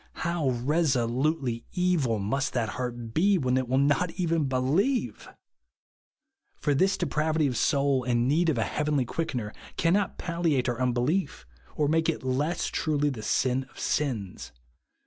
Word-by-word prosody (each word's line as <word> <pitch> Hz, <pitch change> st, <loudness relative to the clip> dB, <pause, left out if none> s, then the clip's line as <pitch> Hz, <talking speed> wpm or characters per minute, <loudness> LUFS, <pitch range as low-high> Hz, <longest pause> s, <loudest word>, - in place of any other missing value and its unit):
Hov/ 145 Hz, -9 st, 0 dB
resolutely 130 Hz, -4 st, +1 dB
evil 175 Hz, -, +1 dB
must 135 Hz, +7 st, -1 dB
that 115 Hz, -4 st, 0 dB
heart 120 Hz, -1 st, -5 dB
be, 195 Hz, -, +3 dB
when 130 Hz, -5 st, 0 dB
it 130 Hz, -1 st, 0 dB
will 130 Hz, +2 st, +1 dB
not 145 Hz, +5 st, +2 dB
even 165 Hz, -3 st, +1 dB
believe! 135 Hz, -, 0 dB, 1.3 s
For 145 Hz, -, 0 dB
this 190 Hz, +7 st, +2 dB
depravity 155 Hz, 0 st, 0 dB
of 130 Hz, -3 st, 0 dB
soul 140 Hz, +1 st, +2 dB
and 120 Hz, 0 st, +1 dB
need 165 Hz, +5 st, +2 dB
of 145 Hz, -, 0 dB
a 115 Hz, -, +2 dB
heavenly 150 Hz, -1 st, 0 dB
Quickener, 125 Hz, -7 st, -3 dB, 0.2 s
cannot 185 Hz, +4 st, +1 dB
palliate 165 Hz, -7 st, 0 dB
our 120 Hz, 0 st, -2 dB
unbelief, 130 Hz, -, 0 dB, 0.3 s
or 150 Hz, -, +1 dB
make 160 Hz, +2 st, +2 dB
it 165 Hz, -, -2 dB
less 140 Hz, +6 st, -1 dB
truly 150 Hz, -2 st, 0 dB
the 115 Hz, -5 st, -6 dB
sin 130 Hz, +4 st, 0 dB
of -, -, -21 dB
sins. 120 Hz, -10 st, -2 dB
140 Hz, 145 wpm, -27 LUFS, 125-160 Hz, 1.3 s, be